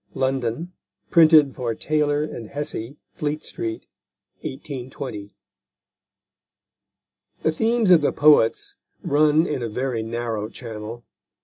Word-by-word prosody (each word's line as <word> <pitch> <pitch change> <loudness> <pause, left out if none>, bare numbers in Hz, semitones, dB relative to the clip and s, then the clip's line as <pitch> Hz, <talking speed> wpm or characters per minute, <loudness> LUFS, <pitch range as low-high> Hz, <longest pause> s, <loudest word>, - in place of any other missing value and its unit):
London: 130 +5 -1 0.4
printed 155 -4 +6
for 120 -3 -3
Taylor 150 +1 0
& 115 - -9
Hessey, 145 -3 -4 0.2
Fleet 150 0 -3
Street_. 110 -1 -5 0.6
1820. 130 -6 -7 2.1
The 160 - +3
themes 225 +4 +2
of 170 -3 +7
the 145 - +2
poets 145 -6 +4 0.3
run 150 +2 +3
in 150 -6 -2
a 115 - -3
very 125 +1 -2
narrow 115 -1 -3
channel. 115 0 -8
135 Hz, 105 wpm, -23 LUFS, 115-150 Hz, 2.1 s, of